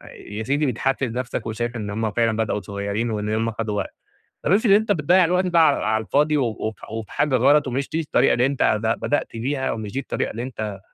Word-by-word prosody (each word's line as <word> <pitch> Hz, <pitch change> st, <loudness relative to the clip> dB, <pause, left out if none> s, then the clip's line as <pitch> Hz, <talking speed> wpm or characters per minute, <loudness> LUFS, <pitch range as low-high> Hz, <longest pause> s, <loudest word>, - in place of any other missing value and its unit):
يا 105 Hz, +2 st, -7 dB
سيدي 140 Hz, +6 st, +1 dB
بتحفِّز 130 Hz, 0 st, -1 dB
نفسك 125 Hz, -1 st, -3 dB
وشايف 120 Hz, +2 st, -3 dB
إن 105 Hz, -3 st, -4 dB
هُم 110 Hz, +1 st, -2 dB
فعلًا 115 Hz, -1 st, +1 dB
بدأو 110 Hz, -2 st, -1 dB
صغيّرين 100 Hz, +4 st, -3 dB
وإن 105 Hz, -1 st, -2 dB
هُم 115 Hz, +1 st, 0 dB
خدوا 110 Hz, -2 st, -3 dB
وقت، 100 Hz, -, -4 dB, 0.5 s
طب -, -, 0 dB
افرض 205 Hz, +2 st, +4 dB
أنت 210 Hz, +1 st, +4 dB
بتضيّع 180 Hz, +1 st, +4 dB
الوقت 180 Hz, +2 st, +1 dB
ده 175 Hz, -2 st, +3 dB
على 155 Hz, -3 st, +5 dB
على 110 Hz, +1 st, +1 dB
الفاضي 150 Hz, +6 st, +2 dB
و 135 Hz, -, +2 dB
وف 110 Hz, -1 st, -4 dB, 0.2 s
وفي 110 Hz, -2 st, -6 dB
حاجة 145 Hz, -3 st, +1 dB
غلط 140 Hz, +4 st, +4 dB
ومش 130 Hz, +2 st, -2 dB
دي 160 Hz, -, -1 dB
الطريقة 155 Hz, -, +2 dB
اللي 120 Hz, -, +3 dB
أنت 135 Hz, -5 st, +2 dB
ب 110 Hz, +1 st, +1 dB
بدأت 145 Hz, -, 0 dB
بيها، 130 Hz, +3 st, -1 dB
ومش 110 Hz, -2 st, -5 dB
دي -, -, -1 dB
الطريقة -, -, -3 dB
اللي 115 Hz, -, -5 dB
أنت 110 Hz, -5 st, -5 dB
120 Hz, 225 wpm, -22 LUFS, 110-145 Hz, 0.5 s, على